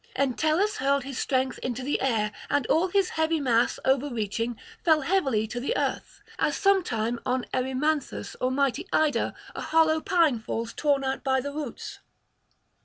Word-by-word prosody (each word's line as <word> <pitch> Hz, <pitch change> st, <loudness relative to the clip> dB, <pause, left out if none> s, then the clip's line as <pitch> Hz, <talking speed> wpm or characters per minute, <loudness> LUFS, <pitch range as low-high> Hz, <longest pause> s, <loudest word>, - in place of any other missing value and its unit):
Entellus 310 Hz, -, +1 dB
hurled 275 Hz, +1 st, +1 dB
his 270 Hz, -1 st, -5 dB
strength 260 Hz, -1 st, 0 dB
into 255 Hz, 0 st, -4 dB
the 285 Hz, -, -1 dB
air, 225 Hz, -5 st, +1 dB, 0.2 s
and 285 Hz, -3 st, +1 dB
all 340 Hz, +4 st, +2 dB
his 385 Hz, 0 st, +1 dB
heavy 320 Hz, 0 st, 0 dB
mass, 240 Hz, -4 st, +2 dB
overreaching, 240 Hz, -4 st, 0 dB, 0.3 s
fell 315 Hz, -2 st, +4 dB
heavily 270 Hz, -, +1 dB
to 240 Hz, +3 st, -5 dB
the 250 Hz, -, -1 dB
earth; -, -, -3 dB, 0.2 s
as -, -, +1 dB
sometime 245 Hz, -, +1 dB
on 255 Hz, 0 st, -1 dB
Erymanthus 265 Hz, +3 st, -1 dB
or 255 Hz, -, +2 dB
mighty 280 Hz, +6 st, 0 dB
Ida 310 Hz, -1 st, +1 dB, 0.2 s
a -, -, -6 dB
hollow 315 Hz, 0 st, +3 dB
pine 325 Hz, -10 st, +2 dB
falls 225 Hz, +1 st, -4 dB
torn 285 Hz, -2 st, +1 dB
out 265 Hz, 0 st, -2 dB
by 265 Hz, -1 st, +2 dB
the 285 Hz, +2 st, -5 dB
roots. 295 Hz, -5 st, -6 dB
275 Hz, 160 wpm, -26 LUFS, 245-315 Hz, 0.3 s, fell